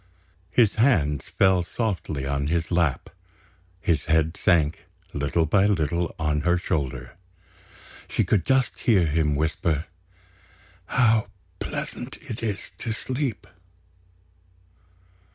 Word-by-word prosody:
His 105 +3 +4
hands 75 - +2
fell 95 -1 +3
softly 85 - -3
on 70 0 -1
his 85 +2 -1
lap; 85 -7 0 0.7
his 80 -4 0
head 80 0 +2
sank 80 -5 +1 0.3
little 70 +3 +1
by 95 +6 +3
little 85 -3 0
on 75 -2 0
her 85 +2 +2
shoulder. 65 -7 -3 0.9
She - - +1
could 100 -6 +2
just 130 +3 +1
hear 100 -7 +3
him 75 -1 +1
whisper: 80 +1 0 1.0
"How 115 -4 +3 0.3
pleasant 125 +2 -5
it 120 -8 -7
is 105 -3 -3
to 115 - -3
sleep!" 130 -2 -3
85 Hz, 110 wpm, -25 LUFS, 75-105 Hz, 1.0 s, His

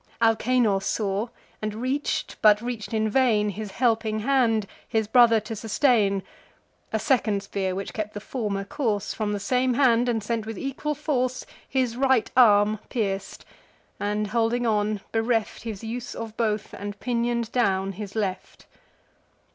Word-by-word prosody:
Alcanor 225 -2 +3
saw; 200 +2 -1 0.3
and 215 0 -3
reach'd, 260 +5 -2
but 210 -1 +6
reach'd 235 -2 -5
in 220 -1 +1
vain, 215 -3 +3
His 210 +1 -6
helping 225 -3 +1
hand, 230 -4 +2 0.2
his 220 -1 0
brother 230 -1 +6
to 215 +2 -6
sustain. 210 -3 +2 0.7
A 220 - +1
second 215 -4 +1
spear, 190 -2 -2
which 195 +1 -5
kept 215 -1 -4
the - - -3
former 205 -3 -3
course, 215 -4 -2
From 215 -2 -2
the 205 - -2
same 250 +4 +1
hand, 245 -2 +4
and 225 -3 0
sent 225 0 -2
with 225 - -5
equal 275 +2 -3
force, 255 -4 -1 0.2
His 255 -3 0
right 265 -3 +2
arm 210 -3 +5
pierc'd, 195 -4 -3 0.5
and 210 +1 -1
holding 230 +3 0
on, 210 -2 +1
bereft 225 -1 0
His 220 -2 -6
use 235 +2 -5
of 225 -1 -6
both, 215 -2 -1
and 205 +1 -6
pinion'd 235 -1 -1
down 195 -5 +1
his 200 +1 -8
left. 195 -4 -4
220 Hz, 150 wpm, -25 LUFS, 210-245 Hz, 0.7 s, but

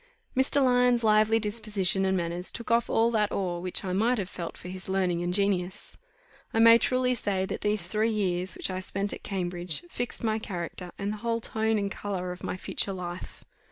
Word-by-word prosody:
Mr. 265 +2 +3
Lyons' 245 -1 +3
lively 215 +1 +4
disposition 210 -3 +1
and 190 0 +2
manners 175 +1 -1
took 235 0 -6
off 235 0 +3
all 230 +1 +3
that 210 -2 +1
awe 180 -3 -2
which 180 +2 0
I 185 - -2
might 230 +6 +2
have 195 -3 -3
felt 170 -2 -6
for - - -10
his 185 +1 -7
learning 185 -3 +1
and 175 0 -1
genius. 190 -1 -1 0.6
I - - +2
may 230 +1 +8
truly 255 0 +2
say, 195 -5 -1
that - - -5
these 210 0 0
three 220 +1 +1
years, 185 -4 -1
which - - -2
I 185 - -3
spent 195 +2 -2
at - - -8
Cambridge, 175 -5 -2
fixed 245 0 -4
my 220 -1 +1
character, 180 -3 -5
and 200 +1 -2
the - - -6
whole 230 +1 -1
tone 220 0 0
and 200 -1 -1
colour 185 -3 -4
of 180 - -8
my - - -3
future 195 +1 0
life. 180 -1 -7
200 Hz, 205 wpm, -28 LUFS, 180-225 Hz, 0.6 s, may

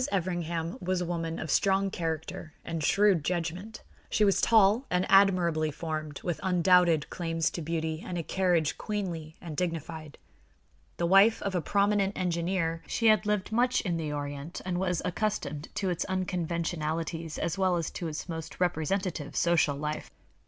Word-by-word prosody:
Everingham 170 -2 -2
was 185 0 0
a 180 - -1
woman 165 -1 -3
of 160 - -4
strong 195 0 +2
character 160 -1 -4
and 165 -2 -3
shrewd 195 -1 +4
judgment. 180 +6 -3 0.3
She 215 - +3
was 195 - +3
tall 220 +3 +4
and 180 +1 +1
admirably 180 -5 +4
formed, 155 -1 -5
with 175 -3 -2
undoubted 180 -4 +3
claims 165 -2 -1
to 170 - -5
beauty 160 0 -2
and 180 - -4
a 170 - -2
carriage 175 -4 +1
queenly 175 -7 -4
and 165 -3 -7
dignified. 160 -2 -4 0.8
The 170 - 0
wife 195 +5 +6
of 200 - -2
a 180 - 0
prominent 200 +2 +1
engineer, 170 -1 -1
she 230 - -1
had 215 -1 +3
lived 210 -1 0
much 245 +3 +2
in 175 -5 -1
the 155 -2 -3
Orient 145 +2 -5
and 180 -1 -1
was 180 -3 0
accustomed 175 -6 -2
to 190 -2 0
its 175 - -1
unconventionalities 165 -3 -2
as 170 +3 -2
well 185 -2 +3
as 165 -3 -2
to 175 - -4
its 155 +1 -5
most 160 -2 -6
representative 175 -2 -1
social 170 -4 +3
life. 150 +2 -4
175 Hz, 160 wpm, -29 LUFS, 160-190 Hz, 0.8 s, wife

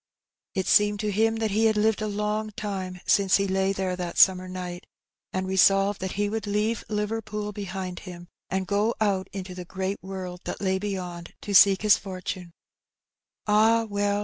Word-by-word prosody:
It 190 - 0
seemed 210 0 +4
to 210 -1 -1
him 225 +2 +2
that 220 -1 -1
he 220 +3 +2
had 220 -1 +3
hved 215 0 +2
a 215 - -1
long 210 +1 -2
life 185 -3 -4
since 195 -2 +4
he 200 0 0
lay 190 0 +1
there 190 -2 -2
that 180 -1 -5
summer 185 -1 +5
night, 180 -1 -6 0.4
and 185 0 -2
resolved 195 +1 +3
that 190 0 -3
he 205 +1 0
would 215 0 -3
leave 210 +3 0
Liverpool 210 0 -3
behind 190 -3 -5
him, 175 -2 -10 0.2
and 190 0 -1
go 205 +4 +1
out 195 -3 +1
into 190 -2 -6
the 180 0 -7
great 190 +2 -4
world 185 -2 -6
that - - -4
lay 190 -1 0
beyond 180 -4 -5
to 205 - -4
seek 195 +1 +7
his 210 -1 +6
fortune 185 -1 -6
^ - - -20 0.5
'' - - -39
Ah, 220 +2 +4
well 205 0 0
195 Hz, 190 wpm, -26 LUFS, 185-210 Hz, 0.5 s, seek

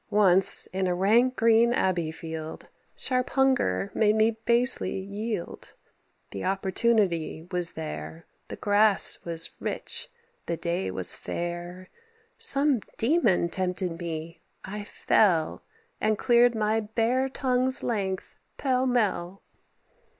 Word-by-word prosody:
Once, 195 -1 +5
in 190 0 -1
a 180 - 0
rank 230 +7 +3
green 230 +1 +4
abbey 180 -9 0
field, 160 0 -8 0.3
Sharp 255 -1 -1
hunger 175 - +1
made 215 -1 +2
me 220 +1 +3
basely 245 +2 +3
yield. 200 +1 -6 0.6
The 100 - -6
opportunity 190 -4 0
was 180 -1 -1
there; 160 +1 -7 0.2
The - - -7
grass 205 0 +3
was 165 -1 -2
rich; 470 +1 -3 0.4
the 170 - -2
day 170 - -2
was 95 -1 +2
fair. 175 +1 -6 0.5
Some 275 -2 +4 0.2
demon 225 - +2
tempted 180 -2 -2
me: 165 -1 -6 0.2
I 205 +1 -6
fell, 175 -6 +1 0.4
And 215 0 +1
cleared 240 +1 +3
my 215 0 +1
bare 230 +5 0
tongue's 260 -1 0
length, 195 -5 -3 0.2
pell 260 -1 0
mell." 195 -6 -1
200 Hz, 115 wpm, -26 LUFS, 175-235 Hz, 0.6 s, Once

